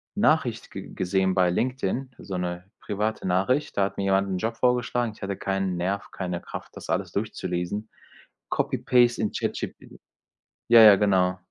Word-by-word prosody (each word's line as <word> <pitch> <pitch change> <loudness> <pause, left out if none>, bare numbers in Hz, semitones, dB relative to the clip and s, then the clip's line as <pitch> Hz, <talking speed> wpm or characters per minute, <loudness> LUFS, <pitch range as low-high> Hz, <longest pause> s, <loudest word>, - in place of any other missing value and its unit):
Nachricht 155 - +1
ge - - -7
gesehen 95 0 +1
bei 90 -1 +3
LinkedIn, 130 +4 -1
so 95 -2 -5
'ne 90 +1 -4
private 105 0 -2
Nachricht, 100 +11 +1
da 100 - +4
hat 100 - -6
mir 100 - -1
jemand 95 0 +2
'nen 95 - -1
Job 115 +4 -2
vorgeschlagen. 125 -1 +1
Ich - - -20
hatte 100 0 -3
keinen 95 -1 -1
Nerv, 95 +3 -2
keine 90 -2 -4
Kraft, - - -9
das - - -10
alles - - -1
durchzulesen, 100 0 -3 0.6
copy-paste 120 -1 +2
in 110 - 0
ChatGPT - - -5 0.7
ja, 115 -1 +9
ja, 105 -2 +10
genau. 95 -2 +2
100 Hz, 160 wpm, -25 LUFS, 95-115 Hz, 0.7 s, ja